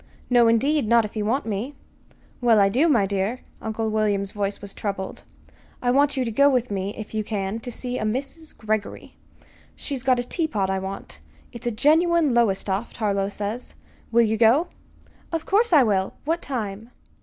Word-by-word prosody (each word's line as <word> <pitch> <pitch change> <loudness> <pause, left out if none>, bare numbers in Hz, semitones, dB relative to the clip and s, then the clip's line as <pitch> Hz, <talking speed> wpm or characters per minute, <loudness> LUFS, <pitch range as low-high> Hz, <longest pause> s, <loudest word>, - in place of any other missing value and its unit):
"No, 240 -1 +6
indeed 270 +4 +2
not 235 0 +4
if 210 - -9
you 210 -1 -1
want 255 +6 0
me." 225 +6 -3 0.7
"Well, 230 -3 +5
I 195 -1 +5
do, 265 +11 +3
my 230 -9 +4
dear." 200 +5 -2 0.2
Uncle 220 0 -2
William's 205 -2 0
voice 200 -1 -2
was 200 -1 -8
troubled. 195 -2 -5 0.5
"I 245 - +1
want 285 +2 +3
you 255 - +1
to 230 - -2
go 280 +6 +5
with 250 -4 0
me, 195 0 -3
if 215 0 -8
you 215 0 -1
can, 205 0 -3
to 245 +2 -7
see 250 +1 -4
a - - -2
Mrs. 275 +8 -4
Greggory. 215 -2 -3 0.6
She's 275 -4 -5
got 255 0 +3
a 245 - 0
teapot 240 - -1
I 190 - 0
want. 190 +1 -7 0.3
It's 240 0 -7
a - - +1
genuine 315 +4 +3
Lowestoft, 205 -2 0
Harlow 200 -3 0
says. 210 +4 -5 0.4
Will 235 +1 +5
you 220 0 +1
go?" 240 +10 +4 0.6
"Of 325 -1 -2
course 440 +4 +2
I 300 -5 +7
will! 195 -4 0
What 330 +3 0
time?" 225 -4 -5
225 Hz, 185 wpm, -24 LUFS, 205-265 Hz, 0.7 s, I